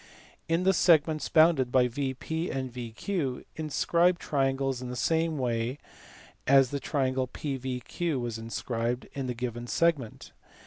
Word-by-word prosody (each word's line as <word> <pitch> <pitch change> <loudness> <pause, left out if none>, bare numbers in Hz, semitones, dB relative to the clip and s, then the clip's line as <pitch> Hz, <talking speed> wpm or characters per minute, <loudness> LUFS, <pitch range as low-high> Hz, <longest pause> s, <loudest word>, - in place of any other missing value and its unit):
In 165 +2 +2
the 190 +1 +4
segments 160 -3 +3
bounded 155 -6 +4
by 125 -1 +4
VP 140 +6 -3
and 130 -2 -4
VQ 125 - -3
inscribe 170 +3 +2
triangles 135 -4 0
in 125 - -5
the 125 - -5
same 160 +3 +1
way 120 0 -1 0.7
as 135 -2 +5
the 140 - -2
triangle 130 -2 0
PVQ 135 +3 -3
was 120 -2 -4
inscribed 115 +1 -3
in 135 -2 -3
the 125 - -3
given 120 0 -4
segment. 150 -7 0
135 Hz, 135 wpm, -28 LUFS, 125-160 Hz, 0.7 s, as